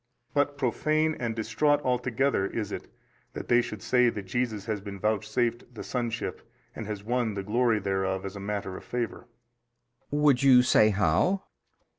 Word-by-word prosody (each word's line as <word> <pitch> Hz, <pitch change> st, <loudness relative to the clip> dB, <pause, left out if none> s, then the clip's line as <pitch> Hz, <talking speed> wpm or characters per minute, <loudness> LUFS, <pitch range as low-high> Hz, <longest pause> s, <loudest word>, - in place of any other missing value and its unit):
But 145 Hz, 0 st, +1 dB
profane 155 Hz, +5 st, +1 dB
and 115 Hz, -2 st, -2 dB
distraught 115 Hz, +7 st, +2 dB
altogether 125 Hz, -3 st, +1 dB
is 105 Hz, -1 st, -4 dB
it -, -, -6 dB, 0.5 s
that -, -, -7 dB
they 120 Hz, 0 st, +5 dB
should 110 Hz, -3 st, -7 dB
say 125 Hz, -1 st, +4 dB
that 105 Hz, -4 st, -5 dB
JESUS 110 Hz, -1 st, -2 dB
has 110 Hz, -3 st, -2 dB
been 100 Hz, -1 st, -8 dB
vouchsafed 115 Hz, +4 st, -1 dB
the -, -, -6 dB
sonship 120 Hz, -2 st, -3 dB, 0.3 s
and 110 Hz, -, -6 dB
has 105 Hz, -2 st, -5 dB
won 120 Hz, -1 st, -1 dB
the 100 Hz, -, -3 dB
glory 115 Hz, +2 st, +2 dB
thereof 95 Hz, -1 st, -1 dB
as 100 Hz, +1 st, -6 dB
a -, -, -6 dB
matter 100 Hz, -1 st, -4 dB
of -, -, -9 dB
favour. 120 Hz, 0 st, -4 dB, 0.8 s
B. 145 Hz, -, -2 dB
Would 145 Hz, -4 st, +4 dB
you 130 Hz, -2 st, +7 dB
say 110 Hz, -3 st, +5 dB
how? 100 Hz, -, +2 dB
115 Hz, 170 wpm, -28 LUFS, 105-125 Hz, 0.8 s, you